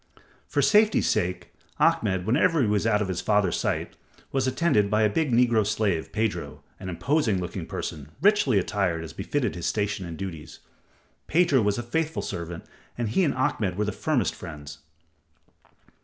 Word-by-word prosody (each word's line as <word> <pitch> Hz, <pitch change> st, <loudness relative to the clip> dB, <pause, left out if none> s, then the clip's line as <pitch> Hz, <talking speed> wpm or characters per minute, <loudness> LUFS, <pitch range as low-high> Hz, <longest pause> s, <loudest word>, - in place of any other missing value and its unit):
For -, -, +1 dB
safety's 215 Hz, 0 st, +4 dB
sake, 90 Hz, 0 st, -1 dB, 0.3 s
Ahmed, 95 Hz, -4 st, +2 dB
whenever 155 Hz, -, +3 dB
he 130 Hz, -, +3 dB
was 105 Hz, +1 st, +1 dB
out 105 Hz, -2 st, +2 dB
of -, -, -4 dB
his 90 Hz, -2 st, -2 dB
father's 105 Hz, -4 st, +2 dB
sight, -, -, -2 dB, 0.4 s
was 135 Hz, -1 st, 0 dB
attended, 130 Hz, -7 st, +2 dB
by 110 Hz, +1 st, +2 dB
a 105 Hz, -, +4 dB
big 155 Hz, +2 st, 0 dB
negro 120 Hz, -2 st, +4 dB
slave, 100 Hz, -5 st, -1 dB
Pedro, 85 Hz, -10 st, -3 dB, 0.2 s
an 95 Hz, -, -6 dB
imposing 105 Hz, -, +1 dB
looking 90 Hz, -1 st, -5 dB
person, 75 Hz, -2 st, -5 dB
richly 195 Hz, -, +4 dB
attired 95 Hz, -4 st, 0 dB
as 80 Hz, -, -8 dB
befitted 125 Hz, +3 st, -2 dB
his 85 Hz, -1 st, -4 dB
station 100 Hz, -3 st, -1 dB
and 80 Hz, -1 st, -7 dB
duties. 85 Hz, -6 st, -7 dB, 0.7 s
Pedro 160 Hz, -6 st, +3 dB
was 105 Hz, -1 st, +1 dB
a 120 Hz, -, -3 dB
faithful 160 Hz, +7 st, -2 dB
servant, 85 Hz, 0 st, -5 dB, 0.3 s
and 120 Hz, -3 st, -1 dB
he 190 Hz, -, +2 dB
and 150 Hz, -, +1 dB
Ahmed 105 Hz, -7 st, 0 dB
were 105 Hz, -, +1 dB
the 105 Hz, -, -1 dB
firmest 150 Hz, -1 st, 0 dB
friends. 75 Hz, -4 st, -9 dB
105 Hz, 170 wpm, -26 LUFS, 90-130 Hz, 0.7 s, safety's